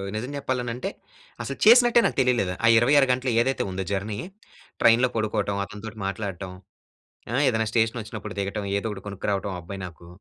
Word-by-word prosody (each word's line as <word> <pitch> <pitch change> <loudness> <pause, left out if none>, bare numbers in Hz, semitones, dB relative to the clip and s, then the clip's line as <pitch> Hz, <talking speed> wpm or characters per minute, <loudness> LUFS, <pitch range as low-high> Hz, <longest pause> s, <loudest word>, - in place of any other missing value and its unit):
నిజం 120 +6 -4
చెప్పాలనంటే 125 -3 -3 0.5
అసలు 140 - -5
చేసినట్టే 240 +1 +7
నాకు - - 0
తెలియలేదు. 120 -8 +1
ఆ - - +6
26 135 +4 +5
గంటలు 125 0 0
ఏదైతే 135 +3 0
ఉందో 95 0 -3
జర్నీ, 100 +1 -2 0.6
ట్రైన్‌లో 120 +2 +5
పడుకోవటం, 105 -2 -1
అతనితోటి 105 +2 -9
మాట్లాడటం. 100 -2 -5 0.8
ఆహ్, 135 +4 +2
ఏదైనా 110 -2 +1
స్టేషన్ 115 +1 +1
వచ్చినప్పుడు 110 -3 -7
దిగటం 100 +1 -2
ఏదో 100 - -2
ఒకటి 100 -2 -7
కొనుక్కురావటం 100 0 -2
ఆ - - -6
అబ్బాయి 95 +4 -8
నాకు. 85 -1 -13
110 Hz, 160 wpm, -25 LUFS, 100-125 Hz, 0.8 s, చేసినట్టే